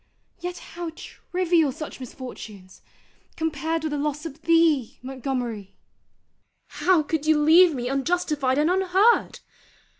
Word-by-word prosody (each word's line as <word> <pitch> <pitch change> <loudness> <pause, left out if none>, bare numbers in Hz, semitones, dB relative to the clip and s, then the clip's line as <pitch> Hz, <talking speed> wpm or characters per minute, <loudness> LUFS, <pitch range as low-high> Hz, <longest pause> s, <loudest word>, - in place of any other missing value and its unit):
Yet 355 0 -5 0.2
how 345 -1 -5
trivial 345 -4 -1
such 305 +2 -8
misfortunes, 220 -7 -10 0.5
compared 320 0 -2
with 310 - -2
the 295 - -2
loss 300 +1 -3
of 310 -1 -8
thee, 325 -7 +2
Montgomery! 250 -6 -4 0.9
How 360 -4 +2
could 310 0 -3
you 315 -1 +4
leave 325 +2 +6
me 245 -1 -3
unjustified 275 -1 0
and 300 +1 +3
unheard? 380 +5 +2
305 Hz, 120 wpm, -24 LUFS, 265-335 Hz, 0.9 s, leave